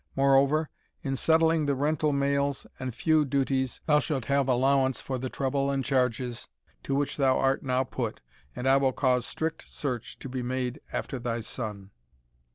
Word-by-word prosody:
Moreover, 140 +3 +3 0.3
in 135 -1 -1
settling 160 +1 +3
the 140 - +2
rental 150 +2 +1
mails, 140 0 0
and 130 -3 -4
feu 155 +3 +3
duties, 135 -2 0
thou 150 -2 +4
shalt 135 -5 -2
have 140 -1 +2
allowance 130 +1 +2
for 130 -1 -4
the 130 +1 -3
trouble 140 +1 -1
and 135 -2 -1
charges 125 -2 0 0.3
to 135 - -2
which 140 0 -1
thou 135 -2 +3
art 135 0 +2
now 130 -1 +1
put, 130 - -4 0.4
and 125 - -3
I 135 +1 +6
will 135 -1 +2
cause 125 -2 +1
strict 160 0 -4
search 125 -6 -4
to - - -8
be 130 0 -4
made 125 +2 -3
after 135 - -3
thy 120 -1 -2
son." 105 -4 -6
135 Hz, 170 wpm, -28 LUFS, 125-140 Hz, 0.4 s, I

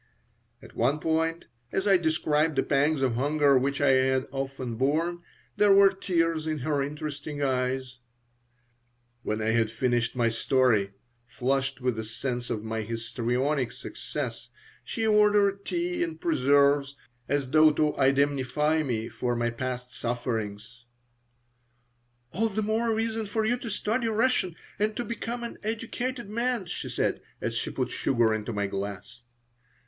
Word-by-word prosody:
At - - -14
one 135 +6 +1
point, 165 +1 0 0.3
as 195 +2 -1
I 195 - +6
described 160 -2 +1
the 135 - +2
pangs 145 0 +2
of 130 -3 +2
hunger 145 +3 +3
which 135 +2 +1
I 140 - +3
had 130 0 +3
often 135 -2 -4
borne, 155 +8 0 0.4
there 210 -1 +5
were 195 0 +7
tears 165 -4 0
in 155 -1 -1
her 145 -2 +1
interesting 145 0 -4
eyes 130 -1 -1 1.2
When 110 -1 -2
I 110 - +1
had 115 -1 +2
finished 120 0 0
my 120 -2 +2
story, 115 -4 +2 0.3
flushed 135 +1 -1
with 125 -3 0
a - - -2
sense 120 +2 -4
of 110 -3 -3
my 110 0 -3
histrionic 120 +4 -1
success, - - -6 0.3
she 225 - -3
ordered 205 -2 +3
tea 350 0 -2
and 330 -2 -4
preserves, 140 - +3 0.3
as 140 -2 0
though 155 +1 +7
to 150 0 +1
indemnify 140 +2 +2
me 115 -6 -2
for 120 -1 -2
my 120 0 0
past 125 +1 -5
sufferings 115 -2 -4 1.5
"All 225 +9 +1
the 215 +1 -2
more 225 +2 +1
reason 225 -1 -1
for 220 +2 -1
you 240 +3 +2
to 240 - -6
study 225 +3 -1
Russian 220 -6 +1 0.2
and 215 +1 0
to 240 - -2
become 235 +2 -4
an 235 - -6
educated 230 +2 -3
man," 235 0 -1
she 170 - -5
said, - - -1 0.2
as - - -2
she - - -2
put - - -2
sugar 115 -4 +2
into 110 +2 -3
my 105 -2 -1
glass. 100 +4 -5
140 Hz, 150 wpm, -27 LUFS, 125-195 Hz, 1.5 s, were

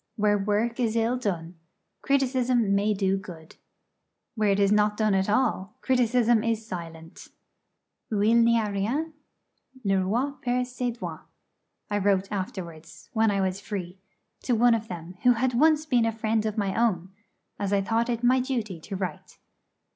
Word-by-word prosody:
Where 210 -1 +2
work 215 +4 0
is 230 -2 0
ill 230 +2 +1
done, 175 -8 -4 0.4
criticism 255 -5 +1
may 205 +1 +2
do 195 -1 +1
good. 165 -4 -12 0.8
Where 215 -3 +1
it 200 0 +2
is 200 0 +3
not 210 0 +2
done 215 -2 +2
at 190 +1 +1
all, 215 -4 0
criticism 240 -3 +2
is 225 -1 -1
silent. 165 -4 -8 0.8
'Où 205 -1 +1
il 235 +1 +5
n'y 235 0 +4
a 210 -2 -2
rien, 255 +12 -2 0.7
le 195 -2 +2
roi 240 +9 0
perd 250 0 0
ses 245 -1 -4
droits.' - - -7 0.6
I 205 - +1
wrote 195 -1 +1
afterwards, 185 -6 -7
when 225 -1 +3
I 200 -1 0
was 190 +1 -1
free, 190 -3 -6 0.4
to 245 - 0
one 240 +1 +5
of 225 -1 -2
them, 175 0 -8
who 250 - +5
had 250 +2 0
been 240 - -1
once 310 0 +4
a 230 -2 +3
friend 220 0 -1
of 215 +1 -4
my 200 -2 0
own, 190 -6 0 0.5
as 200 -1 -2
I 200 -1 +2
thought 230 +4 0
it 235 0 -2
my 255 +2 +4
duty 235 -9 -3
to 195 +5 -7
write. 185 -5 -6
215 Hz, 170 wpm, -26 LUFS, 195-240 Hz, 0.8 s, il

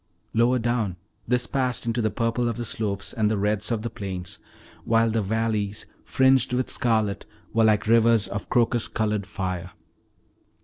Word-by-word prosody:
Lower 120 +3 +3
down 115 -5 -1 0.3
this 125 +1 +1
passed 130 -4 -1
into 115 +1 0
the 110 - +1
purples 115 +3 -1
of 115 - -2
the 120 - -3
slopes 100 -3 -3
and 110 -3 +1
the 110 - 0
reds 105 +2 +1
of 110 -2 -1
the 115 - -2
plains, 95 -5 -5 0.4
while 115 0 +2
the 110 0 +1
valleys, 105 -1 -1 0.2
fringed 130 -1 +3
with 125 +1 0
scarlet, 110 -5 0 0.3
were 115 0 +4
like 105 -1 +3
rivers 115 -1 +4
of 105 0 -6
crocus 120 -2 +3
colored 105 -3 -1
fire. 90 -2 -4
110 Hz, 165 wpm, -25 LUFS, 105-120 Hz, 0.4 s, were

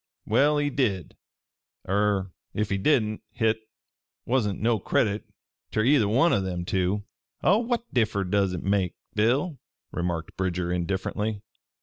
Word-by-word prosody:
Well, 145 +7 +3
he 145 0 +1
did 105 - -1 0.7
er 100 -1 +1 0.2
ef 105 -1 0
he 95 - +1
didn't 110 -2 +2
hit 110 -2 +1 0.7
wasn't 115 -6 +1
no 115 0 +2
credit 105 +2 +1 0.4
ter 110 - +1
either 125 -3 +4
one 135 +11 +4
o' 100 - +3
them 90 -2 -3
two." 95 +3 0 0.4
"What 235 +4 +1
differ 110 -5 +2
does 95 0 +1
hit 90 - -4
make, 95 -2 +1 0.2
Bill?" 130 +8 +1 0.3
remarked 85 -2 -3
Bridger 90 -1 -1
indifferently. 100 +4 -2
105 Hz, 130 wpm, -26 LUFS, 95-120 Hz, 0.7 s, either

